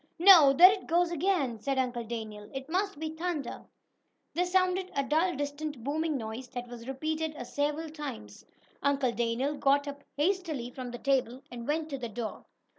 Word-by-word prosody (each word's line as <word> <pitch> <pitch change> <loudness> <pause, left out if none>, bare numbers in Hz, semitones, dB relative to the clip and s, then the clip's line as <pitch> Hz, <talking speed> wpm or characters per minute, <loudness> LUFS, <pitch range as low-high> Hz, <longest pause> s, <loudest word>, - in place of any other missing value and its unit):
"No. 335 -6 +9
There 355 +7 +9
it 390 -1 -4
goes 345 +1 +2
again!" 315 - 0
said 270 +5 -1
Uncle 245 -2 0
Daniel. 215 -2 -6
"It 270 0 -5
must 375 +2 -1
be 315 0 -3
thunder!" 320 -4 -4 0.7
There 355 +2 +1
sounded 370 0 +1
a 275 - +1
dull 320 +6 +1
distant 290 -2 -4
booming 305 +2 -1
noise, 225 +2 -6
that 245 0 -4
was 240 0 -10
repeated 310 +3 -2
several 295 +4 -2
times. 110 - -7 0.4
Uncle 275 -2 +2
Daniel 235 +4 0
got 285 0 +2
up 285 0 -7
hastily 310 -7 -1
from 255 -1 -6
the 240 - -6
table 260 -1 0
and 235 -1 -7
went 310 +1 0
to 275 - -3
the 240 -2 -4
door. 220 0 -5
285 Hz, 175 wpm, -30 LUFS, 245-320 Hz, 0.7 s, No